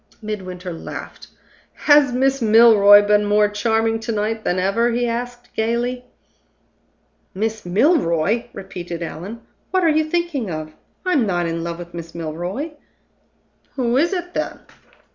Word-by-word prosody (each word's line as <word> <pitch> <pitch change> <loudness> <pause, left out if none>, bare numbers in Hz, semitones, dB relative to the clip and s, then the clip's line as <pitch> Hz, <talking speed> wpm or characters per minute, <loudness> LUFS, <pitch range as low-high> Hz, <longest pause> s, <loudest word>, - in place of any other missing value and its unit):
Midwinter 185 -4 -6
laughed. 165 - -8 0.5
"Has 290 -3 +4
Miss 265 +2 +1
Milroy 215 -2 +7
been 210 0 +3
more 210 0 +3
charming 225 +2 0
to 225 - -4
night 215 +1 -2
than 180 - 0
ever?" 200 +6 +1
he 240 +1 0
asked, 245 +1 -5
gayly. 240 +3 -1 1.3
"Miss 215 -1 -3
Milroy!" 210 - +2
repeated 175 -3 -7
Allan. 190 +8 -7 0.3
"What 375 -1 +1
are 330 - +4
you 310 0 +3
thinking 310 - -2
of! 155 -1 -5 0.3
I'm 295 -11 +2
not 175 -2 0
in 165 0 -3
love 170 0 -4
with 175 0 -10
Miss 170 -1 -8
Milroy." 175 - -4 1.0
"Who 245 -3 0
is 320 +7 +3
it, 355 -2 -4
then?" - - -3
220 Hz, 140 wpm, -20 LUFS, 180-245 Hz, 1.3 s, Milroy